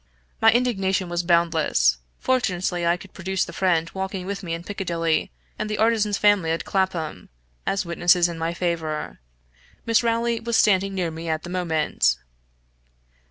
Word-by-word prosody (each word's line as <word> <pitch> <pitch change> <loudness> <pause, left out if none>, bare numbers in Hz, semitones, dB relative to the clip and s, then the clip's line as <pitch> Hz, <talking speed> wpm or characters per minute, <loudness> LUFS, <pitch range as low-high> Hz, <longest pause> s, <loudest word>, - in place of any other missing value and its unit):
My 225 - +7
indignation 195 -6 +1
was 175 0 0
boundless; 165 - +2 0.2
fortunately 180 -8 0
I 170 +1 +3
could - - -14
produce 190 0 -1
the - - -10
friend 170 -4 +1
walking 190 -1 -4
with 200 +1 -4
me 165 -2 -3
in 170 - -8
Piccadilly, 170 -5 -1 0.3
and 215 - -2
the 215 - -2
artisan's 215 -2 +2
family 205 -5 +3
at 165 +1 -1
Clapham, 175 - -2 0.4
as 195 -1 0
witnesses 175 +1 +3
in 170 -1 -6
my 165 +1 -2
favor. 160 - -3 0.7
Miss 230 -1 +3
Rowley 230 0 0
was 235 0 0
standing 195 -1 +3
near 175 -3 -1
me 165 +1 -6
at 155 0 -1
the 175 - -7
moment. 160 - +1
180 Hz, 160 wpm, -23 LUFS, 165-200 Hz, 0.7 s, My